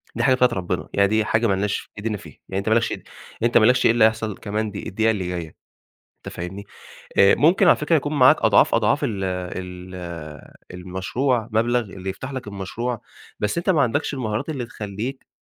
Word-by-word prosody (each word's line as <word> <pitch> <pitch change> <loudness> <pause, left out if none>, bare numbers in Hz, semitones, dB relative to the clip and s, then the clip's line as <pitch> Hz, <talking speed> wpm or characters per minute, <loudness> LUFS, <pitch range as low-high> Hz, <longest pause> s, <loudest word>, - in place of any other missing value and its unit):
دي - - -1
حاجة 130 -1 +5
بتاعة 125 0 +4
ربِّنا، 90 -3 -3
يعني 100 0 +4
دي 110 +1 +1
حاجة 115 +2 +2
مالناش 100 0 -1
إيدين 105 0 -2
فيها، 80 -6 -14
يعني 95 - -3
أنت 100 - -2
ما - - +4
لكش 115 0 +1
إيد - - -6 0.4
أنت 120 0 +4
ما 110 - +6
لكش 125 +3 +4
إيه - - +6
اللي 115 -1 +5
هيحصل 110 -2 0
كمان 105 +1 -3
دب 100 - -6
الدقيقة 110 +3 +1
اللي 95 -5 -3
جاية، 85 -3 -5 0.6
أنت - - -10
فاهمني؟ 95 +4 -6 0.5
آآ 100 - +7
ممكن 165 +6 +4
على - - +7
فكرة 150 +2 +1
يكون 145 0 0
معاك 130 - +8
أضعاف، - - +4
أضعاف - - +2
ال 100 -4 -2
ال 90 0 -5 0.8
المشروع، 100 +7 -2
مبلغ 120 +3 +2
اللي 95 -3 -7
يفتح 130 +8 -6
لك 130 -3 -6
المشروع، 105 +4 -4 0.4
بس 105 +7 -1
أنت 170 +3 -1
ما 165 -6 +4
عندكش 140 +4 0
المهارات 115 -1 -3
اللي 135 -6 -3
تخلّيك 110 +4 -6
110 Hz, 200 wpm, -22 LUFS, 95-125 Hz, 0.8 s, معاك